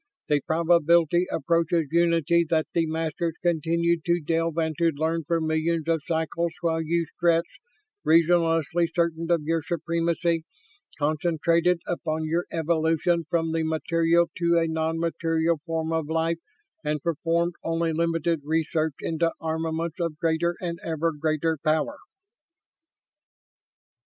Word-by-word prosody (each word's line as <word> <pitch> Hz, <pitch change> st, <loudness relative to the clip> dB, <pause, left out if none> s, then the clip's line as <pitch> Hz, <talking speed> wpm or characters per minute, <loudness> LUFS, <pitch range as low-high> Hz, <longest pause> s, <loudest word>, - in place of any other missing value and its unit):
The 145 Hz, -1 st, +3 dB
probability 170 Hz, +1 st, +3 dB
approaches 165 Hz, -2 st, +1 dB
unity 170 Hz, 0 st, +3 dB
that 160 Hz, -2 st, +2 dB
the 165 Hz, -1 st, +1 dB
Masters 160 Hz, +1 st, -2 dB
continued 170 Hz, 0 st, +1 dB
to 175 Hz, 0 st, +2 dB
delve 165 Hz, +1 st, -1 dB
and 160 Hz, -1 st, 0 dB
to 170 Hz, -, +2 dB
learn 160 Hz, +2 st, -1 dB
for 165 Hz, +2 st, +1 dB
millions 160 Hz, 0 st, 0 dB
of 165 Hz, -2 st, +1 dB
cycles 165 Hz, 0 st, -1 dB
while 165 Hz, -1 st, 0 dB
you 170 Hz, +1 st, 0 dB
Stretts, 170 Hz, -1 st, +2 dB, 0.6 s
reasonlessly 165 Hz, 0 st, +3 dB
certain 165 Hz, -1 st, 0 dB
of 170 Hz, -3 st, +2 dB
your 165 Hz, +1 st, 0 dB
supremacy, 170 Hz, +1 st, -1 dB, 0.5 s
concentrated 165 Hz, +3 st, +1 dB
upon 160 Hz, -2 st, -2 dB
your 165 Hz, +3 st, 0 dB
evolution 165 Hz, +1 st, +1 dB
from 165 Hz, -2 st, 0 dB
the 165 Hz, 0 st, 0 dB
material 165 Hz, +1 st, +2 dB
to 170 Hz, -1 st, +3 dB
a 165 Hz, -, +3 dB
non 160 Hz, 0 st, -1 dB
material 165 Hz, 0 st, 0 dB
form 165 Hz, 0 st, -2 dB
of 160 Hz, -2 st, -1 dB
life 165 Hz, +1 st, 0 dB, 0.4 s
and 150 Hz, -1 st, -2 dB
performed 170 Hz, +1 st, 0 dB
only 165 Hz, 0 st, 0 dB
limited 165 Hz, 0 st, 0 dB
research 160 Hz, 0 st, 0 dB
into 165 Hz, 0 st, 0 dB
armaments 160 Hz, +1 st, -2 dB
of 165 Hz, -3 st, -2 dB
greater 165 Hz, +2 st, 0 dB
and 170 Hz, -2 st, -4 dB
ever 165 Hz, 0 st, -1 dB
greater 155 Hz, +1 st, -1 dB
power." 160 Hz, -, +1 dB
165 Hz, 130 wpm, -25 LUFS, 160-170 Hz, 0.6 s, The